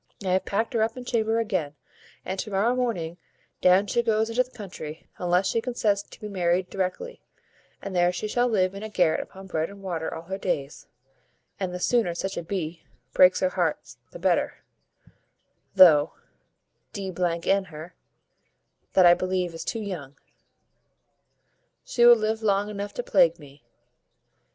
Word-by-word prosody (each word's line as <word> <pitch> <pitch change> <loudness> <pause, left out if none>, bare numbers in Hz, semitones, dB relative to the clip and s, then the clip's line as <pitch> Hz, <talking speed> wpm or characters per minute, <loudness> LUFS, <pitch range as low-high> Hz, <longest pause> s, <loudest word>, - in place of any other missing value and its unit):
I - - 0
have 185 +1 +1
packed 225 +6 -1
her 230 - +1
up 225 +2 0
in 250 - -7
chamber 225 -2 0
again, 185 -10 -2 0.5
and 190 +1 -4
to 215 - -4
morrow 205 +5 +1
morning 180 -9 -2 0.4
down 185 +2 +5
she 235 +4 +1
goes 225 -1 +1
into 240 +2 +2
the 255 - -3
country, 180 -9 -9
unless 180 +1 +1
she 230 - 0
consents 225 -4 0
to - - -16
be 210 - -6
married 180 -2 0
directly, 195 - -4 0.6
and 195 -2 -5
there 175 0 +3
she 180 +4 -4
shall 245 +3 +1
live 190 -5 +1
in 195 - -8
a 220 - -6
garret 180 -6 +2
upon 190 0 -11
bread 160 -4 -2
and 200 0 -13
water 170 -4 -3
all 165 - -7
her 190 +3 -5
days; 145 -7 -3 0.7
and 190 -2 -2
the 180 - -5
sooner 200 -4 +1
such 195 +2 -3
a - - -3
b 170 -2 -4 0.3
breaks 185 0 +5
her 185 - +2
heart 160 -9 -2
the - - -10
better, 175 0 0 1.1
though, 165 -5 +7 0.8
d 195 -3 -5 0.3
n 195 0 +2
her, 160 +1 -10 1.0
that 185 - +6
I 175 - +9
believe 185 -1 -1
is 165 - -6
too 220 -3 -4
tough. 145 -8 -6 1.7
She 240 - +2
will 240 - +10
live 220 0 -1
long 205 -1 +1
enough 205 0 -6
to - - -3
plague 170 - +3
me." 145 -2 -17
190 Hz, 170 wpm, -25 LUFS, 175-220 Hz, 1.7 s, will